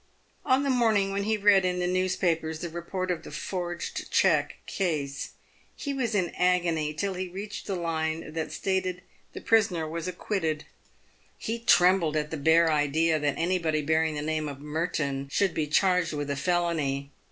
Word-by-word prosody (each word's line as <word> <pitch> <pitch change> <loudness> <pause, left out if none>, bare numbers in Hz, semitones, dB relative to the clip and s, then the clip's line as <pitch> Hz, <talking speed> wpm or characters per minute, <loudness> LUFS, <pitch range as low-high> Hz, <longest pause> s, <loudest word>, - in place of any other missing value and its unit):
On 265 0 +3
the 280 - +1
morning 220 -6 +2
when 200 0 -1
he 220 0 +1
read 200 -2 +5
in 180 -1 0
the 180 - 0
newspapers 180 -3 0
the 170 - -3
report 180 +2 -3
of 175 - -2
the - - -10
forged 175 -2 -4
cheque - - +3
case, 150 -7 -2 0.4
he 285 - -4
was 240 -5 -1
in 180 -4 0
agony 170 -4 +2
till 195 +6 -2
he 185 0 -4
reached 200 +3 -7
the 195 - -1
line 160 -2 -2
that 160 -1 -3
stated 185 -2 -1 0.3
the - - -7
prisoner 205 -7 +3
w 155 0 -4
r - - -2
as 165 - -5
acquitted. 170 -4 -2 0.7
He 230 +1 -3
trembled 180 -7 +4
at 150 0 -2
the 160 - -3
bare 160 +3 +4
idea 155 +2 +2
that 145 -2 0
any 180 +2 +1
body 155 -2 0
bearing 160 +1 +1
the 145 - -3
name 155 -1 -1
of 140 -1 -8
Merton 150 -2 -2
should 195 +4 +2
be 155 -1 -1
charged 180 +1 +2
with 145 -1 -3
a - - -1
felony. 145 -3 0
170 Hz, 185 wpm, -27 LUFS, 155-190 Hz, 0.7 s, read